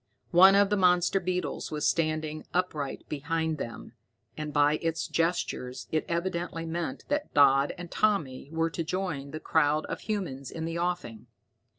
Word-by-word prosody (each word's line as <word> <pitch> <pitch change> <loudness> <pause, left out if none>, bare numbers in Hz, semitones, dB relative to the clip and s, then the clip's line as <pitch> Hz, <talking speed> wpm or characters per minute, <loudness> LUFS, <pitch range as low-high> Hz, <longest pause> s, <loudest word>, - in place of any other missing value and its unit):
One 190 +2 +8
of 200 0 +4
the 205 - +3
monster 180 0 +3
beetles 180 0 -2
was 150 -1 -1
standing 155 -1 0
upright 155 -6 -2
behind 160 +1 -2
them, 115 0 -7 0.4
and 155 -1 -4
by 145 +1 +3
its 165 -1 -1
gestures 165 -7 -1
it 155 - 0
evidently 170 -1 -2
meant 165 -4 -4
that 295 +1 -1
Dodd 140 -1 +5
and 175 -1 -8
Tommy 155 -12 0
were 165 0 0
to 165 - -2
join 165 -5 -3
the 155 +2 -6
crowd 150 0 +2
of - - -5
humans 165 - -4
in 160 -1 -5
the 165 +1 -3
offing. 175 -11 -3
165 Hz, 160 wpm, -28 LUFS, 150-180 Hz, 0.4 s, One